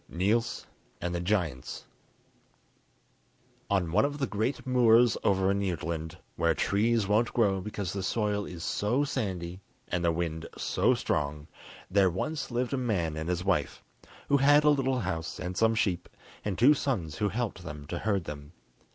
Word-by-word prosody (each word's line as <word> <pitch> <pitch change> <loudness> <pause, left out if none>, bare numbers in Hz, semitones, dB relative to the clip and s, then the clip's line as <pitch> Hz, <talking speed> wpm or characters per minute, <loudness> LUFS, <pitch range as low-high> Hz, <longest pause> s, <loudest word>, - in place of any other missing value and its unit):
] - - -37
Niels 110 +8 0 0.3
And 90 0 -3
The 85 - -1
Giants 85 -8 -2 1.8
On 95 -5 +1
one 85 - +4
of 145 +1 -1
the 140 - 0
great 110 +6 -2
moors 120 -2 +5
over 95 -1 +3
in 100 0 0
Jutland, 85 -2 -3 0.2
where 85 -1 +2
trees 110 +1 +1
won't 110 +3 +2
grow 100 -5 +2
because 100 -2 -4
the 100 - -3
soil 105 +1 0
is 85 -2 -8
so 120 +10 +1
sandy 95 -10 -3 0.3
and 90 0 -1
the 85 - +3
wind 80 -1 -3
so - - +2
strong, 75 0 -2 0.5
there 95 -1 +4
once 135 - -3
lived 125 +1 -1
a - - +1
man 95 -11 -1
and 80 +2 -4
his 90 0 -1
wife, 100 -2 0 0.4
who 140 - +4
had 145 +2 +5
a 150 - +6
little 135 -3 +1
house 85 -4 -3
and 90 +1 -4
some 115 +3 +3
sheep, 90 -5 0 0.3
and 100 -3 -2
two 135 +6 +7
sons 100 - -2
who 105 - +1
helped 110 -2 -3
them 75 -3 -7
to 85 +4 -4
herd 100 -4 0
them. 75 0 -8
100 Hz, 170 wpm, -29 LUFS, 85-115 Hz, 1.8 s, two